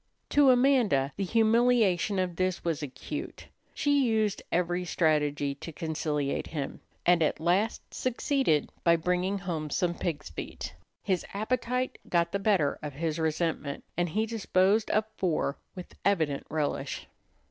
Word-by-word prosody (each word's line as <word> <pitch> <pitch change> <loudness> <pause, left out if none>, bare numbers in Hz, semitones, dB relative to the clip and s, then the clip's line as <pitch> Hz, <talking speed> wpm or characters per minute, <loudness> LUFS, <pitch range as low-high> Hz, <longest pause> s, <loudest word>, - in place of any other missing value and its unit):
To 290 -2 +5
Amanda 245 - +3
the 200 - -2
humiliation 225 -2 +3
of 180 -2 -1
this 185 -1 -1
was 165 -3 0
acute. 140 -3 -6 0.3
She 285 -2 +3
used 220 -4 +1
every 175 +1 +1
strategy 150 -4 +1
to 145 +4 -8
conciliate 155 -3 -2
him, 145 -4 -4 0.3
and 175 -1 +5
at 155 - +1
last 185 +7 0
succeeded 255 - +1
by 170 -1 +5
bringing 180 +4 0
home 165 -5 -3
some 175 +4 0
pig's 155 - -4
feet. - - -6 0.3
His 185 -3 0
appetite 250 +4 -1
got 170 -1 +2
the 200 - -1
better 195 -8 +2
of 150 -2 -5
his 160 +2 -2
resentment, 160 -2 -1
and 175 0 0
he 215 +7 0
disposed 210 -1 +2
of 215 0 +2
four 160 -5 0 0.2
with 180 -1 -9
evident 160 -8 +1
relish. 150 -2 -2
180 Hz, 140 wpm, -29 LUFS, 155-215 Hz, 0.3 s, To